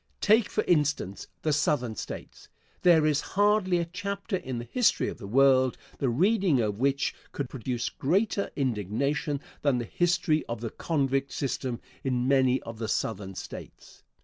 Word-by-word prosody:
Take, 215 +1 +4
for 215 - 0
instance, 145 - 0 0.2
the 155 - +2
Southern 140 -6 +1
States. - - -8 0.3
There 165 -4 +5
is 150 -1 +2 0.2
hardly 205 -3 +3
a 170 - 0
chapter 200 +4 -4
in 130 -9 -4
the 120 - -5
history 245 -3 +2
of - - -8
the 100 - -7
world 130 +2 +4 0.2
the 135 - +1
reading 185 - +3
of 105 -2 -1
which 140 +1 +1 0.2
could 140 -4 -4
produce 125 -1 -3
greater 200 +7 0
indignation 140 - -1 0.2
than 140 -4 +2
the 120 - -2
history 175 - +1
of 115 -1 -3
the 115 -1 -4
convict 135 -3 -1
system 130 -3 -2 0.2
in 125 -2 0
many 130 -1 +3
of 115 -1 -8
the 115 - -2
Southern 95 -2 -2
States. - - -10
140 Hz, 160 wpm, -28 LUFS, 125-175 Hz, 0.3 s, There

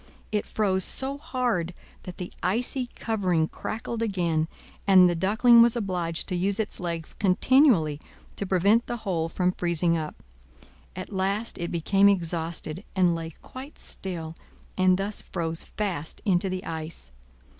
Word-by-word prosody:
It 210 -1 -1
froze 190 -3 +1
so 275 +7 -2
hard 240 - -1 0.3
that 180 - -8
the 180 - -6
icy 240 +6 0
covering 185 -8 +1
crackled 225 +4 -5
again; 170 -7 0 0.4
and 185 -2 +8
the 175 - +2
Duckling 220 +7 +5
was 235 0 +5
obliged 180 -7 -2
to 180 - -1
use 195 +4 0
its 220 - -2
legs 170 -3 -4
continually 195 - +4 0.4
to 200 - -4
prevent 200 +6 +3
the 240 - -2
hole 165 -4 0
from 180 +2 +1
freezing 170 -1 +1
up. 155 -1 -4 0.8
At 185 +3 -7
last 195 +4 -1
it 170 - -2
became 195 +4 +4
exhausted, 170 -1 -2
and 180 -2 +4
lay 165 -1 -4
quite 265 +3 -10
still, 165 -4 -4 0.4
and 185 -1 +4
thus 200 +2 -1
froze 165 -1 -3
fast 180 -7 -3
into 190 -1 +2
the 185 0 -4
ice. 160 - -5
185 Hz, 145 wpm, -26 LUFS, 170-210 Hz, 0.8 s, and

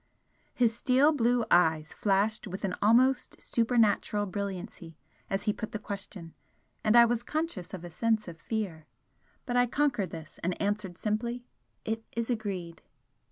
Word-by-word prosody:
His 230 -2 +3
steel 265 +5 +4
blue 240 -4 +2
eyes 160 -2 +3
flashed 210 +2 +1
with 190 +2 -6
an 190 -2 -1
almost 250 +5 +3
supernatural 225 -3 +2
brilliancy 185 -4 -6 0.3
as 195 - -1
he 210 -1 +1
put 220 - -6
the - - -1
question, 195 -4 -7 0.5
and 215 - +3
I 235 0 +9
was 235 0 0
conscious 300 - -3
of 185 -3 -7
a 175 - -8
sense 220 +4 0
of 165 -2 -9
fear. 190 -9 -4 0.6
But 245 -1 -1
I 245 0 +4
conquered 245 - +1
this 160 -1 -10
and 180 +1 -2
answered 200 -3 -2
simply: 235 +4 -2 0.4
"It 225 0 -2
is 235 +1 -1
agreed!" 190 -7 -4
215 Hz, 155 wpm, -29 LUFS, 185-235 Hz, 0.6 s, I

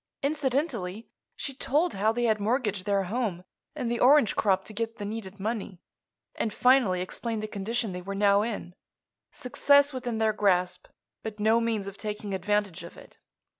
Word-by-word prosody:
Incidentally 265 - -1 0.3
she 275 - -5
told 300 +6 +1
how 210 +3 +2
they 240 +2 -2
had 220 -2 +2
mortgaged 210 -3 -1
their 200 -1 +2
home 195 -3 -2 0.3
and 250 -6 -2
the 240 - -1
orange 270 -3 +5
crop 190 -2 +2
to 215 - -10
get 225 +1 -3
the 205 - -5
needed 205 -2 -6
money, 205 -3 -3 0.5
and 220 - -2
finally 245 -7 +3
explained 220 +4 -3
the - - -2
condition 215 +2 -2
they 180 0 -5
were 200 +2 -5
now 200 0 +4
in—success 250 +7 0
within 245 -3 -3
their 220 -1 +2
grasp, 180 -3 +1 0.3
but 220 -1 -7
no 220 +2 +3
means 225 -3 -1
of 200 0 -8
taking 210 -1 -4
advantage 200 -2 -1
of 170 - -11
it. - - -16
215 Hz, 170 wpm, -28 LUFS, 195-240 Hz, 0.5 s, orange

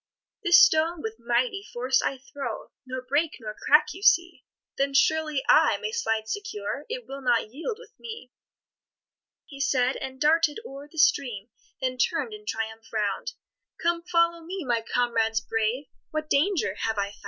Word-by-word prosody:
"This 350 -3 +7
stone 320 +1 +4
with 225 +1 -5
mighty 390 - 0
force 260 - 0
I 270 - -1
throw, 265 -3 -7 0.2
Nor 255 0 -5
break, 290 +5 0
nor 215 -3 -6
crack 295 +7 +3
you 380 - -11
see; 350 -3 +3 0.3
Then 275 0 0
surely 305 -1 +2
I - - +5
may 435 - -4
slide 225 - -1
secure, 420 - -4
It - - -4
will 275 +1 -8
not 240 -4 +1
yield 330 - -4
with - - -15
me." 445 - -9 1.1
He 275 -2 -12
said, 260 -2 +2
and 265 0 -7
darted 310 +2 +3
o'er 275 +1 -9
the 320 - -15
stream, 245 -8 +2 0.3
Then 255 -1 -2
turn'd 435 - 0
in 425 0 -11
triumph 225 0 -4
round: 215 - -2 0.5
"Come, 340 0 +1
follow 335 -1 +1
me, 365 0 -5
my 240 -2 +1
comrades 225 -1 +1
brave, 225 +5 -1 0.2
What 310 0 -4
danger 305 - +2
have 225 -1 -1
I 200 0 -1
found?" - - -15
275 Hz, 165 wpm, -26 LUFS, 235-335 Hz, 1.1 s, This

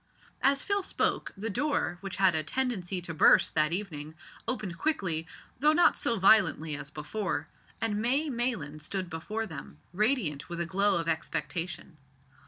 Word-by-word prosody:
As 275 0 +3
Phil 400 0 +1
spoke, - - -1
the 215 +3 -3
door, 285 -9 -1
which 195 -1 -5
had 190 -2 +4
a 160 - +2
tendency 190 - -1
to 170 - -4
burst 155 - +5
that 155 0 +2
evening, 160 -5 -4 0.3
opened 210 -8 -3
quickly, 180 - 0 0.3
though 300 +3 +5
not 345 +2 +5
so 230 - 0
violently 185 -6 +4
as 145 -1 -6
before, 155 +2 -3 0.3
and 215 -2 0
May 270 +7 +2
Maylands 235 - -2
stood 185 +1 -4
before 210 +8 -3
them, 160 - -9 0.2
radiant 205 - 0
with 170 0 -5
a 170 - 0
glow 200 +4 +2
of 165 -1 -1
expectation. 165 +2 -3
190 Hz, 160 wpm, -29 LUFS, 160-225 Hz, 0.3 s, burst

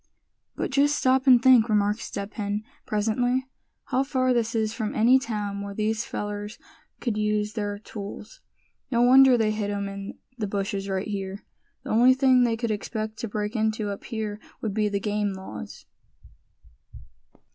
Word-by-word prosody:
"But - - -3
just 285 +2 +3
stop 260 0 +2
and 250 -2 +8
think," 245 -2 +5
remarked 210 0 +2
Step 200 -2 -6
Hen, 205 -1 -3 0.2
presently, 245 +5 0 0.4
"how 260 -1 0
far 260 -2 +1
this 230 -1 0
is 220 -1 0
from 220 -2 -3
any 245 +4 +5
town 210 -5 -4
where 200 0 -6
these 215 +1 -1
fellers 205 +1 -5 0.4
could 230 -4 -2
use 210 0 0
their 205 -2 -3
tools. 210 - -9 0.5
No 235 -2 +2
wonder 260 0 +7
they 220 -2 +2
hid 210 -1 -2
'em 200 -1 -2
in 195 0 -7 0.2
the 210 - -1
bushes 195 0 -3
right 190 0 -2
here. 195 -1 -5 0.4
The - - -5
only 245 +4 +6
thing 260 -1 +4
they 230 -1 0
could 230 -1 -2
expect 215 +1 -4
to 230 - -4
break 210 +2 -3
into 215 -1 0
up 200 - -7
here 215 -2 -4 0.2
would 215 -3 -3
be 210 0 +1
the 200 -1 -1
game 205 0 -1
laws." 110 - -9
215 Hz, 170 wpm, -26 LUFS, 205-240 Hz, 0.5 s, and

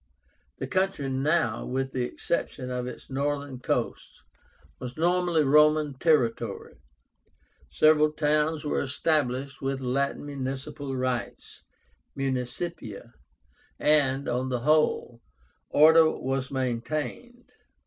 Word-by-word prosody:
The - - -4
country 185 -2 -1
now, 150 +6 +1
with 135 +1 -2
the 130 - -2
exception 125 0 -3
of 125 0 -3
its 125 - -9
northern 140 -1 -2
coast, - - -3 0.6
was 125 +1 -7
nominally 175 -1 +2
Roman 150 +1 +4
territory. 120 -8 0 0.9
Several 155 0 +4
towns 150 0 0
were 145 - 0
established 135 -1 -1
with 135 0 -2
Latin 135 +3 -1
municipal 135 0 -5
rights 130 -2 -4 0.6
(municipia), 125 - -4 0.6
and, 140 -2 +2
on 125 +2 -1
the 125 -2 -2
whole, 150 -5 +1 0.5
order 160 +1 +6
was 135 -2 -3
maintained. 150 - -4
140 Hz, 100 wpm, -27 LUFS, 130-155 Hz, 0.9 s, order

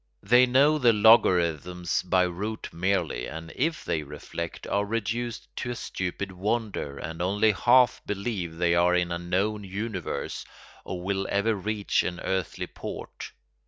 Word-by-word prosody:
They 125 +4 +6
know 140 +5 +4
the 120 -4 +5
logarithms 90 -6 +3
by 90 0 +2
rote 105 +5 -4
merely, 90 -8 0
and 80 +1 -8
if 160 +4 -1
they 80 - 0
reflect 75 +3 -7
are 100 +1 0
reduced 115 +2 -3
to 125 - -3
a 120 - -3
stupid 95 -2 -4
wonder 100 -6 -2
and 80 +1 -6
only 105 +4 +3
half 120 +4 +4
believe 100 -5 -3
they 85 0 +2
are 90 +1 +4
in 90 -1 +1
a 85 - -2
known 100 +4 -1
universe 105 +4 -4 0.4
or 90 -1 -6
will 95 +1 -1
ever 100 +3 +2
reach 105 +1 0
an 90 0 -3
earthly 95 -3 -2
port. - - -8
100 Hz, 150 wpm, -27 LUFS, 90-110 Hz, 0.4 s, They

